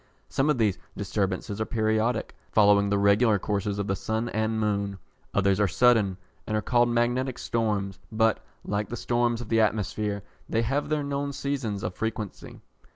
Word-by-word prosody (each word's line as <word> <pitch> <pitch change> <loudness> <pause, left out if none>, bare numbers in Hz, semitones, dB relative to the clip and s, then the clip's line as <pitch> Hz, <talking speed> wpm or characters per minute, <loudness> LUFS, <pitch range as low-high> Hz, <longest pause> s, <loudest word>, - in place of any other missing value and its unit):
Some 135 +3 +1
of 150 - +3
these 105 -5 +1 0.2
disturbances 100 +1 -2
are - - +1
periodic, 110 +1 0 0.2
following 100 -1 +5
the 100 - +2
regular 100 +2 +4
courses 100 +1 -2
of 100 - -1
the 95 - 0
sun 110 +4 -2
and 110 +1 -1
moon. 100 -2 -1 0.4
Others 100 0 +3
are 105 - +4
sudden, 105 -1 +3 0.3
and 110 - 0
are - - 0
called 120 +2 +3
magnetic 120 +2 0
storms, 105 -4 -1
but, 110 0 +2 0.2
like 105 +1 -2
the 120 - -4
storms 120 0 0
of 120 - -8
the 115 -1 +4
atmosphere, 105 -1 -1 0.3
they 115 - +1
have 135 +5 -1
their 155 -1 0
known 140 0 -2
seasons 130 -8 -3
of 90 - -2
frequency. 110 -1 -5
110 Hz, 170 wpm, -27 LUFS, 100-120 Hz, 0.4 s, following